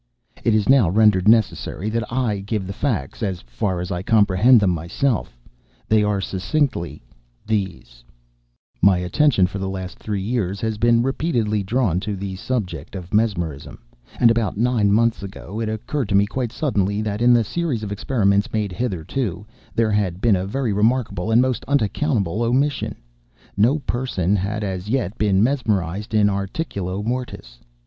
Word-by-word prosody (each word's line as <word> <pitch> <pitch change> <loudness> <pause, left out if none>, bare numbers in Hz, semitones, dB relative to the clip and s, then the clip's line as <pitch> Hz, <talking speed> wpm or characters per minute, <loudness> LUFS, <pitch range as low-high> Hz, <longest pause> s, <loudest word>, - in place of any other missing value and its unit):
It 115 - +3
is 105 -2 +1
now 130 -9 +5
rendered 105 -1 +3
necessary 110 -2 +2
that 115 0 -2
I 120 -5 0
give 100 0 -3
the 95 - -5
facts—as 95 - -2
far 75 +10 -3
as 90 +2 -4
I 90 -1 -2
comprehend 105 +3 +4
them 100 -3 +2
myself. 85 - -2 0.5
They 110 -1 +3
are, 105 -1 +1
succinctly, 95 - -2 0.4
these: 95 - -3 0.8
My 95 0 +5
attention, 95 - +2
for 100 +2 -4
the 95 0 -3
last 95 -2 -6
three 100 -3 -3
years, 100 -4 -2
had 110 -1 -2
been 115 +1 +4
repeatedly 120 -6 0
drawn 100 -3 0
to 105 +1 -4
the 95 0 -5
subject 100 - -4
of 90 0 -8
Mesmerism; 90 -10 -1 0.4
and, 115 -2 +6
about 115 -4 -1
nine 115 -3 +2
months 115 +2 +2
ago 100 +1 -7
it 115 -1 -2
occurred 110 +3 -3
to 100 - +1
me, 100 +1 +5
quite 120 +2 -3
suddenly, 105 -8 -1
that 105 0 -3
in 120 +1 +5
the 120 -1 +5
series 140 - -2
of 100 - -5
experiments 100 0 +1
made 105 -3 -1
hitherto, 100 - -3 0.3
there 115 -2 +2
had 95 -4 0
been 110 0 +3
a 95 +1 -2
very 120 0 -1
remarkable 110 -2 0
and 115 +3 +5
most 130 -3 -1
unaccountable 115 - 0
omission:—no 110 - -1
person 105 -7 0
had 105 +2 -2
as 95 0 -4
yet 120 -5 -1
been 100 -2 +3
mesmerized 105 -6 -1
in 105 -1 +4
articulo 100 - -3
mortis. 115 - -5
105 Hz, 160 wpm, -21 LUFS, 95-115 Hz, 0.8 s, and